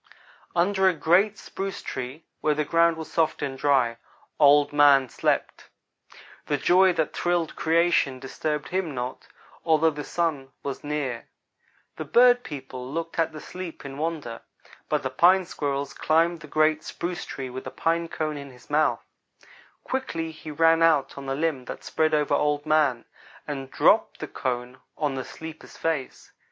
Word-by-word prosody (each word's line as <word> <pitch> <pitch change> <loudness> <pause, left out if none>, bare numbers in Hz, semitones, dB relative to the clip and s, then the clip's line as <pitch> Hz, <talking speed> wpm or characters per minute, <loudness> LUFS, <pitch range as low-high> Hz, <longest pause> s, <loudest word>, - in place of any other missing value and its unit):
"Under 190 +2 +3
a 180 - -1
great 185 +7 +3
spruce 195 0 -6
tree 130 +5 -6
where 150 -1 +1
the 150 0 0
ground 165 +2 +3
was 160 - -7
soft 160 -3 0
and 135 -2 -3
dry, 130 -4 +2 0.4
Old 145 0 +5
man 140 -2 +6
slept. - - -1 0.8
The 145 - +1
joy 185 +5 +5
that 160 -2 -1
thrilled 175 -2 0
creation 160 -4 +2
disturbed 150 +3 -4
him 180 -6 -2
not, 125 +1 -5 0.4
although 160 0 +3
the 150 0 -6
Sun 145 -6 -2
was 140 -1 -5
near. 145 -5 -3 0.7
The - - -5
bird 245 0 +5
people 130 -3 -7
looked 165 +2 -4
at 165 - +2
the 155 - -8
sleeper 175 -3 -8
in 135 +1 -8
wonder, 155 -7 -3 0.5
but - - 0
the - - -2
Pine 185 +2 +5
squirrel 140 -4 -2
climbed 165 +4 +1
the 155 - -11
great 155 +1 +2
spruce 175 0 -4
tree 130 -2 -6
with 130 +1 -7
a - - -3
pine 165 +1 0
cone 155 -2 -3
in 140 -1 -8
his 125 +2 -17
mouth. 155 +1 +2 0.8
Quickly 165 -12 -3
he 155 0 -10
ran 165 +2 +3
out 155 -5 +3
on 140 -1 -8
the 135 - -1
limb 150 -4 -1
that - - -8
spread 155 -1 +1
over 150 -1 +1
Old 150 0 +1
man, 150 -6 +2 0.4
and 135 -3 -5
dropped - - +3
the - - -5
cone 125 0 -4 0.2
on 150 -3 0
the 130 -1 -3
sleeper's 160 +3 -10
face. 160 -5 -3
155 Hz, 165 wpm, -25 LUFS, 140-165 Hz, 0.8 s, man